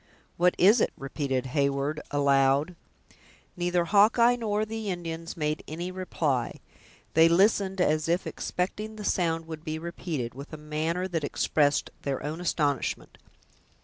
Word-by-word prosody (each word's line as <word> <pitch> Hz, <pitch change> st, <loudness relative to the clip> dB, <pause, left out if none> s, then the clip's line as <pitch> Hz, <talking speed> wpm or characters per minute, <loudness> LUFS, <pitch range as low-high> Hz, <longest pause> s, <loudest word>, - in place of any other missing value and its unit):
"What 180 Hz, +1 st, +3 dB
is 210 Hz, +5 st, +6 dB
it?" -, -, +2 dB
repeated 135 Hz, -2 st, -2 dB
Hewyard 140 Hz, +1 st, 0 dB
aloud. 140 Hz, +3 st, +2 dB, 0.8 s
Neither 175 Hz, -1 st, 0 dB
Hawkeye 220 Hz, +6 st, +5 dB
nor 215 Hz, -3 st, -1 dB
the 220 Hz, -1 st, -4 dB
Indians 165 Hz, -2 st, -5 dB
made 150 Hz, -1 st, -1 dB
any 170 Hz, +4 st, -5 dB
reply. 155 Hz, -9 st, -2 dB, 0.5 s
They 160 Hz, +1 st, +6 dB
listened, 190 Hz, +1 st, +3 dB
as 155 Hz, -2 st, +2 dB
if 175 Hz, +2 st, +1 dB
expecting 210 Hz, +4 st, -3 dB
the 210 Hz, -1 st, -7 dB
sound 165 Hz, -3 st, 0 dB
would 160 Hz, -1 st, -8 dB
be 155 Hz, 0 st, -3 dB
repeated, 160 Hz, -7 st, -4 dB
with 140 Hz, +4 st, -10 dB
a -, -, -5 dB
manner 155 Hz, +4 st, -2 dB
that 165 Hz, -4 st, -2 dB
expressed 145 Hz, 0 st, +1 dB
their 140 Hz, -2 st, -3 dB
own 155 Hz, +4 st, -4 dB
astonishment. 145 Hz, -7 st, -1 dB
165 Hz, 140 wpm, -27 LUFS, 150-185 Hz, 0.8 s, is